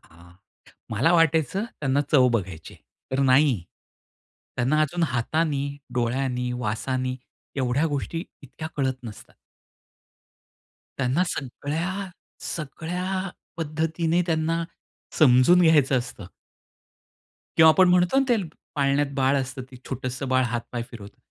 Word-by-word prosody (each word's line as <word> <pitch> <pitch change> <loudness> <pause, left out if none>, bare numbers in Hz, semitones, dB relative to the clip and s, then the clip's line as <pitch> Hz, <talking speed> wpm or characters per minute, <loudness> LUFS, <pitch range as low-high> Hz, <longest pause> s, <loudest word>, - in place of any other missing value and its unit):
हां, 85 +1 -17 0.6
मला 130 +11 +2
वाटायचं 165 - +2
त्यांना 140 - -1
चव 130 -4 +6
बघायचीय. 90 -7 -4 0.3
तर 135 - 0
नाही. 130 - +4 0.9
त्यांना 135 +5 +2
अजून 170 +3 0
हातानी, 145 +2 0 0.3
डोळ्यांनी, 125 +1 -1
वासांनी 130 +3 -2 0.4
एवढ्या 130 +4 +1
गोष्टी 155 +4 -3 0.2
इतक्या 155 +3 -8
कळत 130 -2 0
नसतात. 110 -3 -11 1.6
त्यांना 135 +7 +1
सगळ्या, 165 +8 -3 0.4
सगळ्या 180 +5 -3 0.3
पद्धतीने 160 +2 0
त्यांना 165 0 0 0.6
समजून 145 +5 +6
घ्यायचं 145 -5 +4
असतं. 120 -5 -8 1.3
किंवा 160 0 +8
आपण 185 +2 +5
म्हणतो 180 +8 +4
ना, - - +3
ते 240 - +5 0.4
पाळण्यात 140 0 +2
बाळ 135 0 +2
असतं 135 0 -4
ते - - -11
छोटंसं 130 +1 -4
बाळ 130 0 +3
हात 120 0 -2
पाय 120 -1 -3
फिरवतं. 105 -4 -11
140 Hz, 115 wpm, -25 LUFS, 125-165 Hz, 1.6 s, किंवा